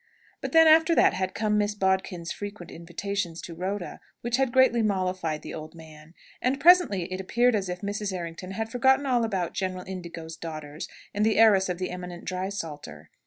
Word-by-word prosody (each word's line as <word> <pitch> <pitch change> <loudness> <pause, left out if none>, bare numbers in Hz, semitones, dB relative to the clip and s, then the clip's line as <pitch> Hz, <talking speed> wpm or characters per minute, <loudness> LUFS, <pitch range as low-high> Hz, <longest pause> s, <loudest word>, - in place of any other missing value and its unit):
But - - -4
then, 325 0 +7
after 320 +1 +6
that, - - +5
had 185 0 -2
come 210 -1 +1
Miss 205 0 0
Bodkin's 190 -3 -1
frequent 205 -4 -7
invitations 175 +1 -4
to 170 - -7
Rhoda, 185 +2 -4 0.2
which 240 +1 0
had 265 -2 +1
greatly 260 -2 +4
mollified 185 -6 -1
the - - -7
old 155 +1 -8
man. 160 0 -14 0.3
And 260 +2 0
presently 345 - +5
it 185 - -3
appeared 240 +6 +2
as 195 -4 -1
if 180 0 -5
Mrs. 205 0 -3
Errington 175 0 -6
had 220 +3 -4
forgotten 265 +3 +3
all 245 -3 +2
about 190 -6 -2
General 185 -1 -3
Indigo's 170 -3 -7
daughters, 155 -1 -7 0.3
and 205 - 0
the 220 0 +2
heiress 205 -4 +5
of 180 - -2
the 185 0 -3
eminent 180 -1 -7
drysalter. 165 - -5
190 Hz, 185 wpm, -26 LUFS, 170-220 Hz, 0.3 s, then